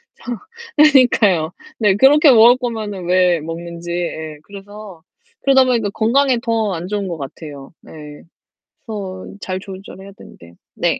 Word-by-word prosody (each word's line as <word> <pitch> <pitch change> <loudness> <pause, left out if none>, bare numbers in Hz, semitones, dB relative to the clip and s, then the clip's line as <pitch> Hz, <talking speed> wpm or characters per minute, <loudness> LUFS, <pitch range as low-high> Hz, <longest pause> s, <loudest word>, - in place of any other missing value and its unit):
상황 240 -2 -7 0.4
그러니까요. 235 - +4 0.3
네. 205 -3 +3
그렇게 285 +5 +6
먹을 240 +2 +6
거면은 215 -7 -5
왜 180 -1 +2
먹는지 170 +2 -7
예. 160 -3 -4
그래서 200 -3 -12 0.4
그러다 265 -1 +4
보니까 230 -5 0
건강에 250 +5 +1
더 225 -4 -1
안 170 +2 -5
좋은 200 -1 -3
것 170 -2 -5
같아요. 140 0 -10
네. 150 -2 -12 0.6
그래서 195 -4 -7
잘 185 0 -4
조절해야 195 0 -11
되는데 85 0 -16 0.2
네. - - 0
195 Hz, 295 characters per minute, -18 LUFS, 170-230 Hz, 0.6 s, 그렇게